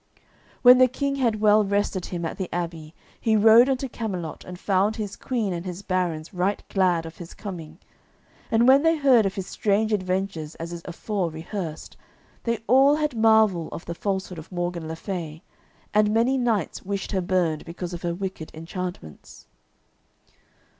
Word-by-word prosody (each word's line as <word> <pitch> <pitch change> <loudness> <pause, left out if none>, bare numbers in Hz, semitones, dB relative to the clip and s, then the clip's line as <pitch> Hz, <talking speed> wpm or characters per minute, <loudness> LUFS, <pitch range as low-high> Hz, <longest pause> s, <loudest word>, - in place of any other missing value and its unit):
When 250 0 +9
the 255 - +7
King 275 +2 -2
had 230 -5 0
well 215 0 +5
rested 200 -2 -1
him 170 -2 -4
at 165 - -5
the 190 - -3
abbey, 165 -2 -5 0.2
he 220 -2 +2
rode 225 +4 +7
unto 270 0 0
Camelot, 190 -9 -5
and 180 0 -9
found 200 +2 +1
his 205 -2 -5
Queen 225 -7 -2
and 170 -1 -4
his 180 +1 -6
barons 175 -3 -2
right 185 +3 -1
glad 180 -4 +2
of 165 0 -9
his 175 0 -10
coming. 165 -6 -8 0.7
And 230 +2 +3
when 270 +2 +7
they 325 +1 +3
heard 255 -8 +5
of 195 - -5
his 195 - -4
strange 210 +2 0
adventures 185 -5 -2
as 165 +1 -6
is 170 - -6
afore 185 +1 -2
rehearsed, 160 0 -6 0.5
they 230 -1 -1
all 270 +4 +5
had 300 -4 -1
marvel 220 -6 +4
of - - -7
the 170 - -4
falsehood 190 -1 -3
of 155 - -12
Morgan 175 -2 -3
le 160 - -4
Fay, 165 -3 -6 0.5
and 210 0 +4
many 230 +4 +2
knights 230 - 0
wished 200 0 -4
her 190 -2 0
burned 175 -4 0
because 175 +1 -6
of 175 - -6
her 170 -1 -2
wicked 185 -4 -5
enchantments. 165 - -7
190 Hz, 175 wpm, -25 LUFS, 170-220 Hz, 0.7 s, When